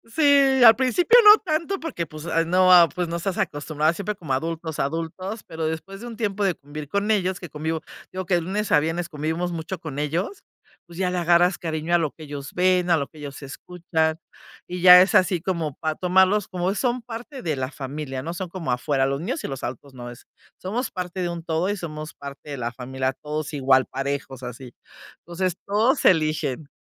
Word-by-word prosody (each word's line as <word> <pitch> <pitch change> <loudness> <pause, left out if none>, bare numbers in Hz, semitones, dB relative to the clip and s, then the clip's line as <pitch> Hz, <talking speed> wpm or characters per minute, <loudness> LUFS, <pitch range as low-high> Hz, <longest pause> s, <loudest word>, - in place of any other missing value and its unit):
Sí, 280 -4 +5
al 225 -2 +10
principio 335 - +4
no 420 +1 +11
tanto 335 +3 -2
porque 300 - -4
pues, 155 0 -10
ah, 165 -1 +1
no, 185 +2 +4
ah, 175 -2 +8
pues, 180 -2 -2
no 170 - -2
estás 180 +2 -3
acostumbrado 150 +1 0
siempre 200 +4 -4
como 165 -8 -8
adultos, 160 +3 -3
adultos, 165 +8 -3
pero 160 0 -5
después 160 +5 -5
de 240 - -8
un 235 - -8
tiempo 210 -2 -1
de 185 -3 +1
convivir 145 +1 -9
con 200 +7 0
ellos 190 -3 0
que 175 - -8
convivo, 160 +2 -3
te - - -25 0.2
digo 185 0 -4
que 180 - +1
de 175 - +1
lunes 200 +5 -3
a - - +6
viernes 165 +3 -2
convivimos 160 +4 -2
mucho 170 +2 -5
con 155 -4 -6
ellos, 175 - -3 0.4
pues, 170 -1 -14
ya 185 -1 0
le 180 - -2
agarras 175 +1 +3
cariño 160 0 -3
a - - +7
lo 160 -4 -1
que 160 - -13
ellos 145 -2 -8
ven, 180 0 +2
a 170 - +5
lo 140 -3 -2
que 155 - -19
ellos 145 -1 -8
escuchan, 160 +2 -2 0.5
y 180 0 -6
ya 180 0 +10
es 190 - +2
así 180 -2 +3
como 170 -6 -2
para 155 -1 -2
tomarlos 190 +3 +3
como 180 +1 -1
son 245 +3 -1
parte 240 +4 -8
de 155 -5 -2
la 130 0 -2
familia, 135 -1 -6
¿no? 170 - -4
Son 185 +1 -5
como 170 -6 -4
afuera 135 +2 +1
los 140 0 -2
niños 240 - -4
y - - -4
los 135 -2 -6
adultos 130 +3 -7
no, 120 -1 -8
es 120 +2 -13 0.3
somos 225 +6 -3
parte 180 0 -5
de 175 - 0
un 170 -1 -5
todo 165 +3 -1
y 205 - 0
somos 155 -4 -7
parte 140 +1 -10
de - - -3
la 120 -1 -3
familia, 130 +2 -3
todos 150 +2 -5
igual 130 -2 +3
parejos 135 -1 -4
así. 125 0 -8 0.5
Entonces, 180 +1 -3
todos 220 +7 +1
eligen. 155 -4 +2
170 Hz, 215 wpm, -23 LUFS, 150-190 Hz, 0.5 s, no